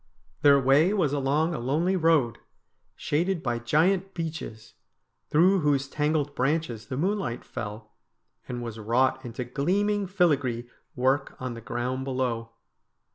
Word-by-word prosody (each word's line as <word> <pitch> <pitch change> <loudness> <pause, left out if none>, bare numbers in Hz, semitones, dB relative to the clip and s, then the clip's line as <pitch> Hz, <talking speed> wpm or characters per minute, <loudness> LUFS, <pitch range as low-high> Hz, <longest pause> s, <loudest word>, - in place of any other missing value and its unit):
Their 140 -1 +6
way 145 +9 +4
was 155 -8 +1
along 145 +4 +1
a - - -3
lonely 155 +10 +1
road, 160 -9 +2 0.6
shaded 170 +3 -1
by 120 -2 -1
giant 180 +10 +1
beeches, 160 -9 -6 0.6
through 185 +5 +4
whose 145 -3 +1
tangled 150 0 0
branches 130 -6 -1
the 130 - -4
moonlight 185 - -1
fell, 105 0 -7 0.6
and 120 -1 -4
was 115 -2 -6
wrought 125 +4 +1
into 120 0 -5
gleaming 195 - 0
filagree 145 -11 +1 0.3
work 130 +3 +1
on 130 -1 -4
the 115 - -9
ground 125 +3 -3
below. 125 -4 -2
140 Hz, 130 wpm, -27 LUFS, 120-165 Hz, 0.6 s, Their